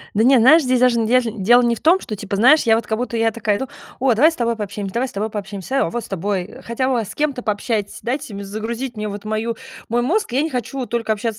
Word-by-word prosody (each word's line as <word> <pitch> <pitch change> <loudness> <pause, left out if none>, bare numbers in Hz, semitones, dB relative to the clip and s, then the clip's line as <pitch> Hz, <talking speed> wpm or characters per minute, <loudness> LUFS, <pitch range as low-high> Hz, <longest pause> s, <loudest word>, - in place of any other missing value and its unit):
Да 220 - +3
не, 260 +1 +6
знаешь, 305 +7 +6
здесь 255 -1 +1
даже 250 -2 +3
н 225 - +1
ежн 230 -3 +1
дело 240 +4 +6
не 235 -1 +2
в - - -12
том, 350 +4 +4
что, 215 - -6
типа, 200 0 -5
знаешь, 260 +9 +5
я 225 -1 +4
вот 225 -1 -2
как 220 - -1
будто 240 0 -3
я 225 0 +2
такая 210 -2 -1
иду: 265 - -4 0.3
"О, 260 -2 +3
давай 300 +9 +5
с - - -8
тобой 235 -1 0
пообщаемся, 200 -2 -5
давай 250 +3 0
с - - -11
тобой 210 +2 -3
пообщаемся, 210 +5 -3
а, - - +2
о, - - -4
вот 240 +4 -4
с - - -10
тобой, 195 +1 -3
хотя 255 +3 -1
бы 240 -4 +1
с - - -9
кем-то 285 -4 -1
пообщайтесь, 210 -1 -2
дайте 255 -1 -3
мне 200 0 -6
загрузить 225 +5 -5
вот 210 -1 -5
мою 220 +2 -2 0.3
мой 240 +1 +1
мозг". 335 - 0
Я 265 +3 +1
не 320 - -1
хочу 255 +1 -4
только 230 -2 -1
общаться 220 +1 -3
230 Hz, 275 wpm, -20 LUFS, 210-255 Hz, 0.3 s, не